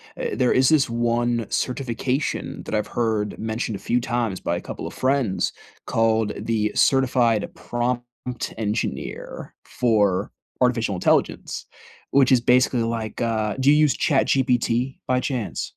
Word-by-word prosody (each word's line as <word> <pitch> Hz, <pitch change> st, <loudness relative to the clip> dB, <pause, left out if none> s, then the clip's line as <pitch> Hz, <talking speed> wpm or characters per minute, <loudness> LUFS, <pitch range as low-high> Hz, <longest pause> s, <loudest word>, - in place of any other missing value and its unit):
eh, -, -, -3 dB
there 125 Hz, -, +2 dB
is 130 Hz, 0 st, +4 dB
this 150 Hz, -6 st, +3 dB
one 120 Hz, 0 st, 0 dB
certification 130 Hz, +2 st, -2 dB
that -, -, -7 dB
I've 105 Hz, -, 0 dB
heard 110 Hz, -3 st, -1 dB
mentioned 110 Hz, -1 st, -3 dB
a -, -, -6 dB
few 125 Hz, -, 0 dB
times 115 Hz, -5 st, -2 dB
by 85 Hz, -, -1 dB
a -, -, -4 dB
couple -, -, -6 dB
of -, -, -8 dB
friends, 130 Hz, -7 st, 0 dB, 0.3 s
called 110 Hz, -1 st, +1 dB
the 105 Hz, -2 st, 0 dB
certified 125 Hz, -5 st, +2 dB
prompt 120 Hz, 0 st, -2 dB, 0.5 s
engineer 105 Hz, -, -4 dB
for 105 Hz, -6 st, +1 dB, 0.3 s
artificial 115 Hz, -5 st, +2 dB
intelligence, 90 Hz, -, 0 dB, 0.5 s
which 135 Hz, -1 st, +4 dB
is 125 Hz, -, +6 dB
basically 125 Hz, 0 st, +3 dB
like, 115 Hz, -1 st, -3 dB
uh 110 Hz, -2 st, 0 dB
Do 135 Hz, +2 st, +4 dB
you 150 Hz, -, +7 dB
use 150 Hz, -3 st, +3 dB
ChatGPT, 130 Hz, -2 st, +1 dB
by 125 Hz, 0 st, +2 dB
chance? 120 Hz, -, -3 dB
120 Hz, 140 wpm, -23 LUFS, 110-125 Hz, 0.5 s, you